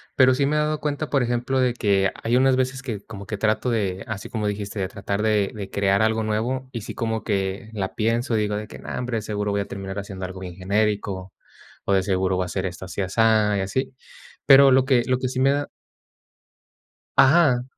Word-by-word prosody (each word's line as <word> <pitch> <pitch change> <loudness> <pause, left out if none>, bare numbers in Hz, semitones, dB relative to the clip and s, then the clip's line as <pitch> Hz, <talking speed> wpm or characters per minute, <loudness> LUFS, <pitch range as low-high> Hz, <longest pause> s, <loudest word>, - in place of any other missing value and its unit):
Pero 130 -1 +5
sí 140 - +1
me 150 +2 +1
he - - +3
dado 150 0 0
cuenta, 150 0 -2
por 135 -3 +2
ejemplo, 120 +2 0
de 125 -2 +2
que 100 -4 +2
hay 120 +2 +1
unas 130 0 +4
veces 130 +1 -1
que 115 -6 -4
como 100 -2 -10
que 105 +1 -4
trato 110 +4 0
de, 100 -5 -1
así 110 -2 -5
como 110 -3 -3
dijiste, 105 0 -3
de 95 - -1
tratar 100 +1 -3
de 105 -2 +2
de 100 -2 -6
crear 100 +1 +2
algo 110 0 +2
nuevo, 120 +5 -2
y 115 -4 -5
sí - - -7
como 115 -2 -2
que 100 0 -2
la 95 -3 -4
pienso 115 +1 0
y - - +1
digo 105 0 -1
de 105 0 -6
que: - - -10
"No, - - -10
hombre, 125 -2 -2
de - - -2
seguro 105 -1 -2
voy 100 0 0
a - - -4
terminar 95 0 -6
haciendo 95 -2 -5
algo 95 0 -7
bien 90 -2 -7
genérico, 100 -1 -1 0.5
o 100 - +1
de 95 - +3
seguro 95 -1 0
va 95 - 0
a - - -7
ser 95 - -2
esto 90 0 -5
así 100 - -4
asá", 105 +1 +2
y 95 - 0
así. 130 +7 -2 0.5
Pero 135 0 +8
lo 130 0 +4
que 130 -4 +3
lo 125 -1 +2
que 130 -1 -2
sí 130 - -3
me 135 +1 +4
da 145 0 -1 1.5
Ajá. 135 -4 +5
110 Hz, 235 wpm, -23 LUFS, 100-130 Hz, 1.5 s, Pero